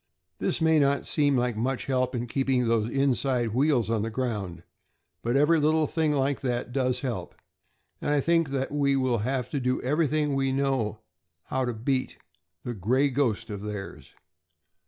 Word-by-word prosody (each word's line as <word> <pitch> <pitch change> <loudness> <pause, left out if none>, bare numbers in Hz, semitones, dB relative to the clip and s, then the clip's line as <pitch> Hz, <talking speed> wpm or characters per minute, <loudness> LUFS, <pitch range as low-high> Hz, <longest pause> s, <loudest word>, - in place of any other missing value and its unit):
This - - -1
may 160 -1 +4
not 140 0 +2
seem 145 -2 +2
to 125 - +2
help 125 -2 -1
much 130 +3 -2
in 130 -2 0
keeping 130 0 0
those 115 -1 +1
inside 130 -2 +1
wheels 130 -4 +2
on 115 -2 +1
the 115 - -2
ground, 105 -9 -3 0.6
but 120 +3 +1
every 155 +3 +4
little 155 +1 +3
thing 160 0 0
like 140 -1 0
that 125 -2 -2
does 125 -2 0
help, 115 -10 -4 0.7
and - - -2
I 145 0 +3
think 165 +1 +2
that 135 0 -2
we 140 -1 +2
will 130 -3 +1
have 125 +3 -1
to 145 - -1
do 125 0 0
everything 150 +1 +1
we 135 -1 +1
know 130 -6 -1 0.4
how 130 0 -1
to 120 - -2
beat 130 +3 -1 0.5
that 120 -6 -6
'Gray 130 +8 +2
Ghost' 115 -5 0
of 100 -1 -5
theirs. 105 -2 -7
130 Hz, 175 wpm, -27 LUFS, 120-140 Hz, 0.7 s, may